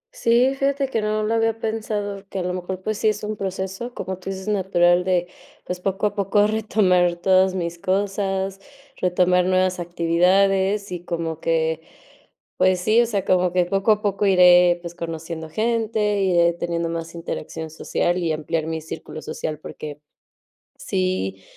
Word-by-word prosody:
Sí, 240 +3 +3
fíjate 275 0 0
que 225 -4 -1
no 215 0 0
lo 220 +2 0
había 225 0 +1
pensado, 210 -3 -3
que - - -6
a 185 - -1
lo 180 0 -2
mejor 185 +1 -5
pues 215 -1 -2
sí 220 - +3
es 210 0 -3
un 215 0 -3
proceso, 190 +5 -5
como 185 0 -5
tú 185 - -7
dices, 190 +1 -6
natural 180 -3 +3
de, 180 -1 +1 0.4
pues, 180 0 -4
poco 195 +2 -1
a 205 - +1
poco 205 0 +2
retomar 195 -5 +2
todas 185 +1 +3
mis 170 -1 -3
cosas, 195 0 -1 0.4
retomar 180 0 +2
nuevas 185 0 +1
actividades 190 +4 +2
y 175 -1 -5
como 165 -2 -3
que, 160 0 0 0.7
pues 185 -1 +3
sí, 215 +6 +4
o - - +3
sea, 205 -4 -2
como 180 -1 +2
que 180 0 +2
poco 195 +4 +1
a 210 -1 +2
poco 205 0 0
iré, 180 -2 +6
pues 170 -1 -8
conociendo 165 -1 -6
gente, 215 0 0
iré 175 -2 +3
teniendo 170 0 -2
más 165 0 -5
interacción 160 -1 -6
social 175 +2 -1
y 170 -3 0
ampliar 155 +1 -2
mi 160 0 -2
círculo 155 0 -8
social, 155 -1 -5
porque, 150 -1 -8 0.8
sí 95 +1 -2
185 Hz, 165 wpm, -22 LUFS, 170-205 Hz, 0.8 s, iré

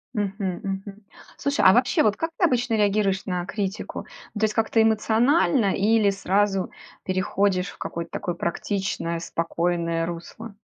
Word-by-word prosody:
Мгм, 195 -3 -2
мгм. 195 +1 -5 0.3
Слушай, 280 0 0
а 190 - +9
вообще, 245 +1 +3
вот 210 -1 +2
как 330 - -2
ты 355 - +4
обычно 245 -5 +1
реагируешь 200 -2 +1
на 180 -2 -2
критику? 195 0 -4 0.4
Ну, 210 - -3
то - - -1
есть 215 - -1
как-то 225 0 +1
эмоционально 225 - +3
или 210 0 +3
сразу 195 0 0 0.3
переходишь 185 0 0
в - - -13
какое-то 170 0 -5
такое 175 - -3
практичное, 170 -1 -2
спокойное 170 0 -1
русло? 175 +6 -8
195 Hz, 145 wpm, -24 LUFS, 180-220 Hz, 0.4 s, а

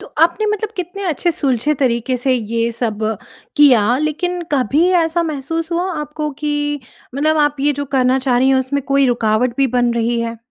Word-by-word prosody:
तो - - -10 0.2
आपने 345 +6 +2
मतलब 425 0 -2
कितने 365 +2 -5
अच्छे 335 +3 0
सुलझे 280 0 0
तरीके 250 0 0
से 260 +2 0
ये 230 0 -1
सब 225 -3 -3 0.6
किया 245 -5 +5
लेकिन 345 +4 -2
कभी 285 +5 +2 0.2
ऐसा 325 +1 0
महसूस 320 +2 -3
हुआ 360 +2 -1
आपको 300 0 -4
कि 295 -1 -2 0.3
मतलब 310 +3 +1
आप 295 -1 +2
ये 290 +1 +2
जो 285 +1 -4
करना 260 0 +3
चाह 255 -2 +1
रही 260 +2 +3
हैं 265 - +4
उसमें 260 +2 -1
कोई 275 -1 +3
रुकावट 235 +1 +1
भी 275 -1 +3
बन 245 -1 +1
रही 235 0 0
है? 230 0 -3
275 Hz, 190 wpm, -17 LUFS, 245-310 Hz, 0.6 s, किया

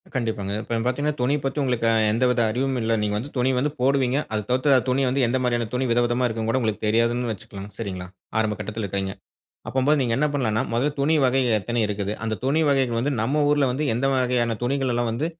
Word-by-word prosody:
கண்டிப்பாங்க. 110 -5 -2
இப்பங் 115 0 -3
பார்த்தீங்கனா, 145 +4 0
துணி 130 +4 +2
பத்தி 135 - -2
உங்களுக்கு 125 -3 0
அ - - +3 0.2
எந்தவித 125 +1 +2
அறிவும் 130 +3 -1
இல்ல. 115 0 0
நீங்க 105 -1 -1
வந்து 125 +7 -5
துணி 125 +2 +2
வந்து 140 +4 +1
போடுவீங்க. 135 -1 +2 0.2
அது 105 - 0
தவிர்த்து 130 +3 +3
அ - - +5
துணி 130 +2 +2
வந்து 135 +2 +1
எந்த 130 +3 +1
மாதிரியான 120 -2 0
துணி 130 +1 0
வித 120 - +3
விதமா 120 +1 +1
இருக்குன்னுகூட 115 +2 -1
உங்களுக்கு 110 -2 -2
தெரியாதுன்னு 115 +2 +1
வச்சுக்களாங்க, 100 0 -8
சரிங்களா? 95 -4 -5 0.3
ஆரம்ப 110 -1 0
கட்டத்தில 110 +1 -4
இருக்கறீங்க. 95 0 -3 0.5
அப்பம்போது 135 +3 +2
நீங்க 120 -3 0
என்ன 150 +2 +2
பண்ணலாம்னா 115 -5 0
முதல்ல 130 +6 +1
துணி 155 +4 +2
வகைகள் 125 -3 +3
எத்தனை 120 +4 -2
இருக்குது? 100 -1 -3
அந்த 110 0 -1
துணி 140 +4 +2
வகைகள் 130 -4 +1
வந்து 140 +5 0
நம்ம 140 +7 +1
ஊர்ல 145 -1 +3
வந்து 145 +5 -2
எந்த 125 +4 -1
வகையான 125 -3 +1
துணிகள் 135 +1 0
எல்லாம் 120 -1 0
வந்து 120 +7 -2
125 Hz, 210 wpm, -23 LUFS, 110-135 Hz, 0.5 s, அ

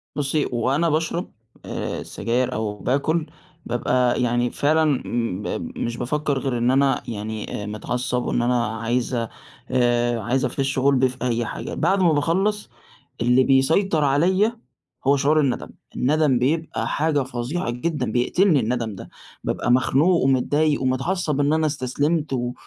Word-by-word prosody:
بُصي 145 +1 0
وأنا 135 +8 +1
باشرب 165 +3 -1 0.3
آآ - - -4
السجاير 120 +4 -1
أو 105 -1 -3
باكل 145 - 0 0.4
بابقى 125 +1 +1
يعني 120 0 +1
فعلًا 155 +2 +2 0.2
م 115 -5 -3
مش 115 0 -3
بافكر 140 +2 -1
غير 130 -3 -2
إن 120 +2 +2
أنا 135 -1 +2
يعني 110 -1 -5
آآ - - -5
متعصب 125 +4 -2
وإن - - 0
أنا 120 0 +1
عايز 115 +3 -2 0.6
آآ 120 -1 +2
عايز 130 +3 0
أفش 135 -1 -1
غُلبي 130 -1 +3
في 130 - -11
أي 120 -2 0
حاجة، - - -6
بعد 195 0 +1
ما 170 -3 +4
باخلص 190 +8 0 0.5
اللي 125 +2 +4
بيسيطر 155 +6 +3
عليّا 185 +11 +2 0.5
هو 140 0 +5
شعور 150 +3 +3
الندم، 135 -4 0 0.3
الندم 140 -1 +2
بيبقى 155 +5 -1
حاجة 150 -2 +1
فظيعة 125 +4 -3
جدًا، 125 -1 -2
بيقتلني 155 - +3
الندم 115 -2 -2
ده - - -10 0.3
بابقى 120 - -1
مخنوق 150 +7 +3
ومتضايق 145 +3 +2
ومتعصب 145 +4 0
إن 145 +1 +2
أنا 155 0 +2
استسلمت 145 +2 -1
و 125 -1 -2
130 Hz, 145 wpm, -23 LUFS, 120-155 Hz, 0.6 s, هو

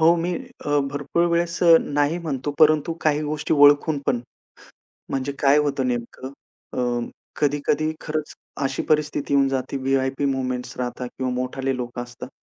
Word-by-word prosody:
हो. 165 +2 +6
मी 175 +1 -1 0.3
अ, 145 0 +2
भरपूर 145 +4 0
वेळेस 170 +1 0
अ, 170 -1 +8
नाही 145 +3 0
म्हणतो. 145 -5 -3
परंतु 155 0 +4
काही 150 -1 +1
गोष्टी 150 +1 -1
ओळखून 145 +1 +5
पण 120 - +1 0.9
म्हणजे 135 +1 -2
काय 140 +1 +5
होतं 140 -3 0
नेमकं 120 +1 -4 0.4
अ, - - -5 0.6
कधी-कधी 145 +1 +1
खरंच 155 -1 -4 0.3
अशी 135 0 -1
परिस्थिती 150 -2 +1
येऊन 140 -1 +4
जाते 135 0 -2
व्ही-आय-पी 135 +1 0
मूव्हमेंट्स 130 -2 -2
राहतात 125 0 -3
किंवा 130 -1 -1
मोठाले 130 +1 -2
लोक 120 -1 -6
असतात 120 -1 -7
145 Hz, 150 wpm, -23 LUFS, 130-155 Hz, 0.9 s, अ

